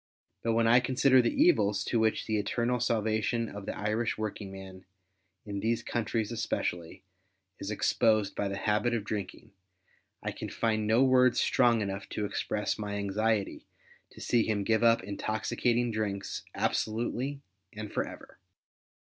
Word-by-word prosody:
But 115 - 0
when 115 0 +3
I 120 +2 +6
consider 130 +1 +4
the 120 - -1
evils 105 - +4
to 115 - 0
which 110 0 +1
the 110 -1 0
eternal 120 +4 0
salvation 110 0 0
of 105 -1 -8
the - - -4
Irish 110 +3 -1
working 105 -2 -4
man, 95 -1 -10 0.6
in 100 -2 -4
these 115 +2 0
countries 115 -2 -2
especially, 90 -8 -3 0.6
is 100 - -5
exposed 110 -1 +2
by 100 - -1
the 100 0 -3
habit 110 +4 +1
of 110 - -2
drinking, 105 -3 -5 0.7
I - - -2
can - - -6
find 110 -2 0
no 115 +4 +4
words 130 -1 +4
strong 120 -3 +3
enough 100 -1 -4
to 105 - -2
express 105 +1 -2
my 105 -1 -3
anxiety 105 +1 -1 0.4
to - - -15
see 120 - +2
him 105 -2 -1
give 110 +1 +2
up 115 -3 +4
intoxicating 115 +4 -1
drinks 105 -3 -3
absolutely 125 +5 -1 0.3
and 105 -1 -7
for - - +1
ever. - - -12
110 Hz, 155 wpm, -30 LUFS, 105-120 Hz, 0.7 s, I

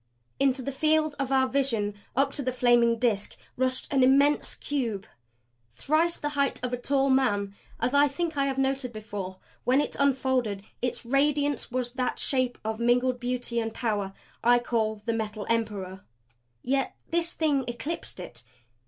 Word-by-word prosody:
Into 265 -1 +2
the 275 - -3
field 310 +2 +2
of 275 -1 -1
our 265 -1 +4
vision, 245 -7 0 0.2
up 275 +2 +2
to - - -2
the 255 -1 -1
flaming 240 -2 +4
Disk 220 -4 0 0.2
rushed 255 0 0
an 270 - +4
immense 280 +3 +4
cube. 235 -9 -2 0.7
Thrice 315 - +1
the 295 - -2
height 280 -2 0
of 250 0 -2
a - - 0
tall 275 +2 +1
man 205 -7 +2 0.3
as 245 +3 0
I 285 +1 +6
think 325 +3 -3
I 275 -1 +1
have 270 -1 -2
noted 270 -1 0
before 205 -3 -6 0.3
when 255 +2 +3
it 295 - -1
unfolded 260 -7 +1 0.2
its 245 -1 -2
radiance 285 +2 +1
was 250 -1 -2
that 255 0 -2
shape 255 -2 0
of 220 0 -2
mingled 245 +1 +2
beauty 245 -1 -1
and 225 -1 -3
power 205 -5 -1 0.3
I 240 +1 +6
call 220 -3 -1
the 230 - 0
Metal 215 -2 -3
Emperor. 200 -5 -2 0.6
Yet 270 +1 0 0.2
this 340 0 +2
Thing 295 -4 +1
eclipsed 265 - -5
it. 120 -9 -8
255 Hz, 165 wpm, -27 LUFS, 230-275 Hz, 0.7 s, I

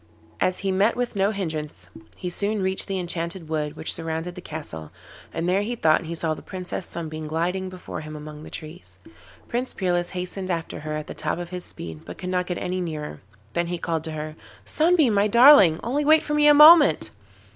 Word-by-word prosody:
As 185 - +1
he 195 - +2
met 200 +4 +2
with 245 -2 -3
no 195 0 +2
hindrance, 160 -7 -5 0.3
he 180 - -4
soon 205 +4 -1
reached 190 0 +2
the 195 -1 -2
enchanted 170 -1 -2
wood 150 -1 -2
which 160 - -1
surrounded 165 +2 -3
the 180 - -9
castle, 145 - -8 0.4
and 165 +1 -3
there 190 +2 +2
he 235 +4 -3
thought 160 -5 +2
he 170 +1 -5
saw 160 -1 -1
the - - -9
Princess 185 -1 -6
Sunbeam 155 -2 -6
gliding 180 +4 -2
before 185 -3 -8
him 155 0 -8
among 150 0 -9
the - - -10
trees. 160 +3 -9 0.5
Prince 250 +2 -3
Peerless 175 -2 0
hastened 185 +1 -5
after 165 -2 -3
her 155 0 -4
at 155 - -5
the - - -8
top 155 0 -3
of 175 -1 -6
his 180 0 -6
speed, 80 -2 -8
but - - -9
could 180 - -5
not 180 -1 0
get 180 - -3
any 185 0 -3
nearer; 150 - -5 0.3
then 170 0 0
he 175 0 -3
called 165 -2 -2
to 160 - -5
her: 155 0 -6 0.3
'Sunbeam, 315 -6 +3
my 200 +1 +3
darling—only 235 - +6
wait 310 +2 +5
for 300 - -3
me 295 0 +4
a 295 - +8
moment. 300 - +7
175 Hz, 210 wpm, -24 LUFS, 155-195 Hz, 0.5 s, a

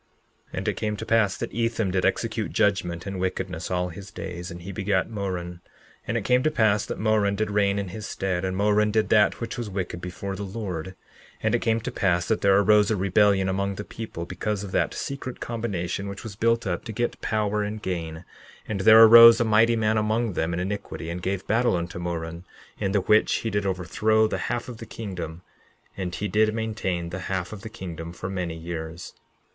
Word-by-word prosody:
11:14 - - -6
And - - -3
it - - 0
came 105 -1 -2
to 110 - -5
pass 110 -4 +2
that - - -4
Ethem 115 -3 0
did 95 0 +2
execute - - -1
judgment 90 -4 0
in 100 -2 -4
wickedness 90 -2 -3
all 90 0 0
his 95 +3 -9
days; 90 -1 -6
and 85 0 -9
he 100 - -6
begat 95 +1 0
Moron. 90 -4 -4 0.5
And 115 - 0
it 110 - -3
came 125 0 +4
to 155 - +2
pass 110 -7 +2
that - - -4
Moron 105 -2 +2
did 105 0 -1
reign 100 -1 +2
in 100 -2 -3
his 110 +3 -6
stead; 90 -2 -2
and 95 0 -2
Moron 105 +1 +3
did 110 0 +1
that 105 -2 +4
which 115 +1 -5
was 115 -3 -4
wicked 95 -3 -4
before 95 +2 -5
the 100 - -6
Lord. 95 -5 -4
11:15 95 - -9 0.5
And 110 +1 +1
it 120 - +3
came 115 0 +1
to - - -4
pass 90 -3 +1
that 110 - 0
there 100 -1 +5
arose 105 +1 +5
a 110 - +2
rebellion 100 0 +3
among 100 +1 -1
the 100 - -5
people, 105 -6 -7
because 100 +3 -3
of 100 - -7
that - - 0
secret 135 -2 -5
combination 100 -5 -3
which 100 0 -7
was 110 -3 -7
built 115 +2 +1
up 90 -3 -2
to - - -5
get 120 +2 -2
power 105 -1 0
and 105 +1 -3
gain; 85 -2 -4 0.4
and 105 -3 -2
there 110 +3 +9
arose 115 +1 +10
a 120 - +2
mighty 110 +2 +4
man 110 -1 +2
among 110 0 0
them 80 0 -1
in 85 - -2
iniquity, 90 -3 -4
and 90 +1 -5
gave 95 +1 -2
battle 120 0 +2
unto 85 0 -4
Moron, 85 -1 -4 0.4
in 95 - 0
which 105 +2 +3
he 115 - 0
did 100 -1 0
overthrow 110 +5 +2
the - - -3
half 120 0 -2
of 120 -3 -7
the 115 -1 -9
kingdom; 90 -7 -6 0.5
and 90 -2 -4
he 105 - -2
did 110 +2 +2
maintain 95 -6 -2
the 90 - -4
half 95 0 -2
of 105 - -8
the 110 - -7
kingdom 85 -6 -7
for 95 +2 -6
many 90 -3 -3
years. 80 0 -6
100 Hz, 215 wpm, -25 LUFS, 90-110 Hz, 0.5 s, arose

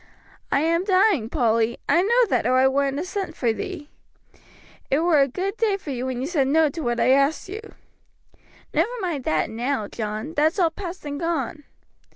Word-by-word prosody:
"I 275 - +3
am 335 +2 +1
dying, 375 - +3
Polly; 230 -4 +1
I 345 - +4
know 475 +5 +4
that, 245 -5 +1
or 255 +1 +3
I 260 +1 +5
wouldn't 275 +1 0
have 320 - -2
sent 370 -3 -4
for 240 - +1
ye. 300 +6 -4 1.0
It 275 +3 +2
was 320 -5 +4
a - - -7
good 380 - -3
day 425 -4 +1
for 325 -7 -7
you 255 0 -3
when 255 -2 -3
you - - -2
said 290 -4 +1
no 310 +2 +3
to 325 +3 -6
what 240 -3 -1
I - - +4
asked 275 +3 +2
you." 410 +4 -6 1.1
"Never - - +2
mind 335 - -3
that 155 +7 0
now, 240 -1 -2
John; 215 +8 -5
that's 310 +4 +2
all 340 -4 +3
past 360 -1 -7
and 285 0 -4
gone." 330 -3 -2
295 Hz, 195 wpm, -23 LUFS, 255-350 Hz, 1.1 s, I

